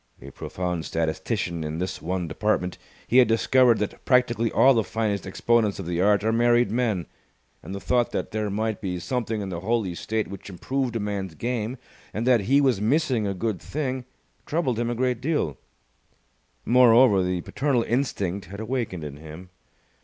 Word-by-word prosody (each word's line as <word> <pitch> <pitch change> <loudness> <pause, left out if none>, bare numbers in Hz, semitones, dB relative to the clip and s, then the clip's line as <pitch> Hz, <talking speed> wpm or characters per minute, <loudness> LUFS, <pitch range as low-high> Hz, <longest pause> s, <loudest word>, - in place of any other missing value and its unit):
A - - -11
profound 90 -2 -4
statistician 85 +2 -2
in 75 +1 -4
this 90 +2 -4
one 90 +1 -2
department, 90 +1 -1 0.3
he 125 - +4
had 125 - +6
discovered 120 +1 +4
that 105 - -4
practically 120 -3 +2
all 135 - +6
the 115 -3 +2
finest 105 -3 -2
exponents 110 +1 +1
of 95 - -6
the 85 +1 -1
art 100 +1 +3
are 110 - +2
married 120 -1 +3
men; 110 -8 0 0.6
and 95 - -7
the - - -4
thought 120 +3 +1
that - - -3
there 110 -1 -2
might 110 +2 -2
be 90 -3 -3
something 110 +2 -2
in 100 - -4
the 85 -2 -4
holy 105 -1 -1
state 110 +5 -2
which 100 0 -9
improved 125 +6 -2
a - - 0
man's 100 -4 -3
game, 120 - -3 0.4
and 110 +3 -1
that 125 -3 +4
he 140 +1 +5
was 130 -7 +2
missing 120 -2 +1
a 100 - -2
good 110 +2 -2
thing, 130 -4 -3 0.4
troubled 135 -8 0
him 120 0 0
a 120 - -1
great 125 -1 0
deal. 145 - 0 1.1
Moreover, 120 -4 +6
the 90 -1 -1
paternal 130 - 0
instinct 100 -8 -2
had 100 +3 -9
awakened 110 -7 -3
in 70 -1 -7
him. 80 +4 -11
110 Hz, 180 wpm, -25 LUFS, 95-120 Hz, 1.1 s, had